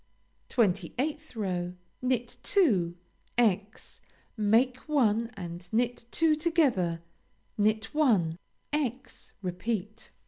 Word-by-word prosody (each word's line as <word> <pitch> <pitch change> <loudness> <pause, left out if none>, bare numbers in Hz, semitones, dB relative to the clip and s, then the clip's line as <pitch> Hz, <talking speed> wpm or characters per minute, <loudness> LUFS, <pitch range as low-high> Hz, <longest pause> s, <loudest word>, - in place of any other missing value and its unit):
28th 240 - 0
row 180 -4 -2 0.3
Knit 250 -2 -1
two; 190 - +3 0.4
× 210 -3 0 0.4
make 230 +4 +3
one 230 -6 +3
and 175 -1 -7
knit 240 +1 0
two 320 +4 +3
together; 265 - +1 0.5
knit 215 +3 +1
one; 200 - +2 0.3
× 265 -4 -3
repeat. 195 +3 -3
220 Hz, 90 wpm, -29 LUFS, 185-255 Hz, 0.5 s, two